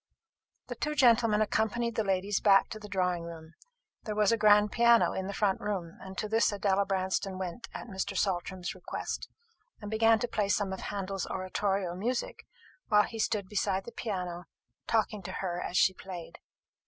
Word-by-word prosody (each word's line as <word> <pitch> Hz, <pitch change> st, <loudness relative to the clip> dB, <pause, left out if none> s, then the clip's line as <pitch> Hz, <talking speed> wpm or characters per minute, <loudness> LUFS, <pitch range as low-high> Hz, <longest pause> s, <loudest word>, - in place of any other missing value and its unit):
The -, -, -5 dB
two 300 Hz, 0 st, -3 dB
gentlemen 230 Hz, -5 st, +4 dB
accompanied 225 Hz, +2 st, 0 dB
the 220 Hz, -, 0 dB
ladies 195 Hz, +1 st, 0 dB
back 195 Hz, -2 st, +5 dB
to 215 Hz, -, -7 dB
the 210 Hz, -1 st, -10 dB
drawing 180 Hz, -3 st, 0 dB
room. 165 Hz, -1 st, -9 dB, 0.5 s
There 215 Hz, -2 st, -3 dB
was 210 Hz, 0 st, +3 dB
a -, -, +4 dB
grand 210 Hz, -1 st, +5 dB
piano 235 Hz, 0 st, +5 dB
in 190 Hz, 0 st, -3 dB
the -, -, -3 dB
front 200 Hz, -1 st, +1 dB
room, 190 Hz, -5 st, -4 dB
and 190 Hz, 0 st, -9 dB
to 215 Hz, -, -2 dB
this 220 Hz, 0 st, +3 dB
Adela 200 Hz, -1 st, +1 dB
Branston 190 Hz, 0 st, -1 dB
went 185 Hz, +4 st, -5 dB
at -, -, -7 dB
Mr. 190 Hz, -5 st, -4 dB
Saltram's 185 Hz, -1 st, -1 dB
request, -, -, -5 dB, 0.5 s
and 205 Hz, -1 st, -7 dB
began 225 Hz, +1 st, +4 dB
to 245 Hz, -, -2 dB
play 210 Hz, -3 st, -1 dB
some 200 Hz, -2 st, +1 dB
of 190 Hz, -, -5 dB
Handel's 195 Hz, -1 st, -4 dB
oratorio 190 Hz, -1 st, -1 dB
music, 235 Hz, +7 st, -3 dB, 0.4 s
while 210 Hz, -1 st, +5 dB
he 225 Hz, -, -6 dB
stood 210 Hz, -3 st, 0 dB
beside 195 Hz, -1 st, -1 dB
the 235 Hz, -, -8 dB
piano, 180 Hz, -7 st, -4 dB, 0.4 s
talking 215 Hz, -2 st, +1 dB
to 175 Hz, -, -7 dB
her 175 Hz, -2 st, -3 dB
as 180 Hz, -, -2 dB
she 190 Hz, -, +5 dB
played. 180 Hz, -2 st, -9 dB
200 Hz, 180 wpm, -30 LUFS, 185-215 Hz, 0.5 s, back